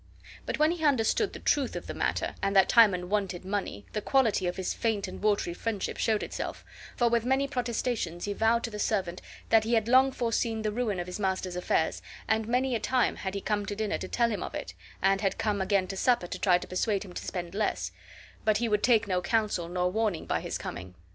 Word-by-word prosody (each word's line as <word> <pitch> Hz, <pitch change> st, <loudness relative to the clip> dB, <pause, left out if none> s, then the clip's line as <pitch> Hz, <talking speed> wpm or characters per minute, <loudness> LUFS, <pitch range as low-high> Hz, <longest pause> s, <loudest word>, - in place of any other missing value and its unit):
But -, -, -1 dB
when 305 Hz, +2 st, +4 dB
he 340 Hz, -2 st, -4 dB
understood 285 Hz, -, +2 dB
the -, -, -7 dB
truth 280 Hz, -4 st, +1 dB
of -, -, -5 dB
the -, -, -5 dB
matter, -, -, -1 dB
and 195 Hz, 0 st, 0 dB
that 190 Hz, -1 st, +6 dB
Timon 195 Hz, -6 st, +5 dB
wanted 190 Hz, -3 st, -1 dB
money, 190 Hz, -, -3 dB
the 210 Hz, -, -1 dB
quality 225 Hz, -7 st, +2 dB
of 175 Hz, -, -2 dB
his 190 Hz, -1 st, -2 dB
faint 220 Hz, -4 st, -1 dB
and -, -, -8 dB
watery 205 Hz, -4 st, +1 dB
friendship 210 Hz, +1 st, -3 dB
showed 220 Hz, -2 st, +1 dB
itself, -, -, -5 dB, 0.3 s
for 240 Hz, -, +3 dB
with 235 Hz, -1 st, +2 dB
many 265 Hz, +3 st, +1 dB
protestations 235 Hz, -, -2 dB
he 205 Hz, -, -2 dB
vowed 225 Hz, +3 st, +2 dB
to 230 Hz, -, -3 dB
the 210 Hz, -, -6 dB
servant 190 Hz, -5 st, -1 dB, 0.3 s
that 225 Hz, -1 st, +5 dB
he 225 Hz, +2 st, -1 dB
had 220 Hz, -1 st, +1 dB
long 260 Hz, +2 st, +5 dB
foreseen 230 Hz, -2 st, -1 dB
the 215 Hz, -, 0 dB
ruin 215 Hz, -4 st, -1 dB
of 175 Hz, -, -3 dB
his 180 Hz, +3 st, -6 dB
master's 190 Hz, -2 st, -1 dB
affairs, 170 Hz, -2 st, 0 dB, 0.3 s
and 220 Hz, 0 st, +1 dB
many 250 Hz, +2 st, +1 dB
a 230 Hz, -, +1 dB
time 250 Hz, +3 st, +1 dB
had 190 Hz, 0 st, -4 dB
he 200 Hz, -, -3 dB
come 210 Hz, 0 st, -1 dB
to 205 Hz, -, -3 dB
dinner 215 Hz, 0 st, -1 dB
to -, -, -5 dB
tell 235 Hz, -1 st, +1 dB
him 210 Hz, -, -3 dB
of -, -, -5 dB
it, -, -, -5 dB, 0.3 s
and 195 Hz, 0 st, +3 dB
had 195 Hz, -2 st, 0 dB
come 205 Hz, -2 st, 0 dB
again 190 Hz, 0 st, +2 dB
to 195 Hz, -, -4 dB
supper 240 Hz, -1 st, +2 dB
to 180 Hz, +1 st, -6 dB
try 180 Hz, -3 st, +4 dB
to -, -, -8 dB
persuade 200 Hz, +2 st, -1 dB
him 180 Hz, -, -11 dB
to -, -, -6 dB
spend 175 Hz, -2 st, -5 dB
less, 210 Hz, +1 st, -1 dB, 0.5 s
but 215 Hz, -1 st, +3 dB
he 235 Hz, +2 st, 0 dB
would 210 Hz, -1 st, +1 dB
take 225 Hz, -3 st, +4 dB
no 180 Hz, -2 st, 0 dB
counsel 200 Hz, -3 st, 0 dB
nor 180 Hz, 0 st, 0 dB
warning 210 Hz, -5 st, -1 dB
by -, -, 0 dB
his -, -, -3 dB
coming. 90 Hz, 0 st, -7 dB
210 Hz, 235 wpm, -29 LUFS, 190-230 Hz, 0.5 s, that